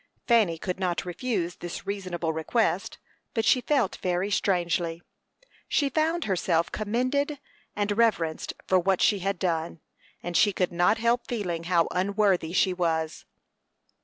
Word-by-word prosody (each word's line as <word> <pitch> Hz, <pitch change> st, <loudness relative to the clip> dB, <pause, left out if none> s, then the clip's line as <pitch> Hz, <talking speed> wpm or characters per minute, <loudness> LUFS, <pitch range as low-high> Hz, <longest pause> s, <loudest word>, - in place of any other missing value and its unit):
Fanny 215 Hz, -9 st, +4 dB
could 180 Hz, +3 st, -4 dB
not 180 Hz, -2 st, -1 dB
refuse 180 Hz, -2 st, -2 dB
this 175 Hz, 0 st, -7 dB
reasonable 185 Hz, -5 st, -3 dB
request, 195 Hz, +5 st, 0 dB, 0.4 s
but 225 Hz, -1 st, +1 dB
she 255 Hz, -, +4 dB
felt 250 Hz, -5 st, +1 dB
very 180 Hz, +2 st, -1 dB
strangely. 175 Hz, -4 st, 0 dB, 0.6 s
She 285 Hz, -2 st, +1 dB
found 325 Hz, +2 st, +1 dB
herself 175 Hz, -3 st, +1 dB
commended 255 Hz, +7 st, -1 dB, 0.4 s
and 205 Hz, 0 st, 0 dB
reverenced 200 Hz, -9 st, +1 dB
for 185 Hz, -, +3 dB
what 190 Hz, +1 st, +1 dB
she 205 Hz, -, +3 dB
had 195 Hz, +2 st, -1 dB
done, 165 Hz, -2 st, -2 dB, 0.4 s
and 175 Hz, 0 st, -4 dB
she 205 Hz, +2 st, +4 dB
could 180 Hz, -1 st, 0 dB
not 175 Hz, +5 st, +3 dB
help 235 Hz, +2 st, +1 dB
feeling 180 Hz, -8 st, -3 dB
how 170 Hz, -1 st, +3 dB
unworthy 190 Hz, -2 st, +1 dB
she 185 Hz, 0 st, +2 dB
was. 160 Hz, -3 st, -1 dB
190 Hz, 140 wpm, -27 LUFS, 175-220 Hz, 0.6 s, Fanny